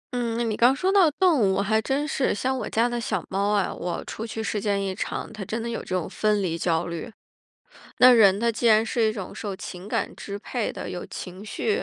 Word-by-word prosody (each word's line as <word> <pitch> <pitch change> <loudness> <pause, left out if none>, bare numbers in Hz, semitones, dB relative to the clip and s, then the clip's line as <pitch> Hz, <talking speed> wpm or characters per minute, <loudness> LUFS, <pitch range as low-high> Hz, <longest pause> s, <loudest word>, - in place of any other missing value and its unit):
嗯， 240 -2 -1
那 240 - 0
你 220 -2 -1
刚 245 +3 +5
说 370 +6 +1
到 385 -5 +6
动 345 -1 +3
物， 195 -2 +2
还 220 +2 +2
真 275 +6 -1
是。 275 -5 0
像 260 +5 -1
我 - - -4
家 230 +2 +2
的 240 0 -2
小 230 - -2
猫 200 +2 0
啊， 205 -2 +1
我 175 0 -4
出 225 - -6
去 225 0 -4
时 215 - -1
间 200 -1 0
一 190 -1 -2
长， 190 - -4
它 215 -3 -7
真 225 +4 -3
的 235 - -3
有 230 - -3
这 185 - -4
种 180 - -2
分 210 -2 +1
离 165 -3 -1
焦 165 -1 0
虑。 170 +7 -5 0.9
那 255 0 +9
人 200 -5 +6
他 230 +1 +1
既 230 +2 -1
然 220 0 +5
是 235 0 +1
一 215 - +2
种 195 -4 -7
受 200 -3 -5
情 190 0 -8
感 - - -2
支 200 0 -7
配 230 +2 -3
的， - - -6
有 175 - -5
情 185 +2 -8
绪 425 - -1
220 Hz, 265 characters per minute, -25 LUFS, 195-240 Hz, 0.9 s, 那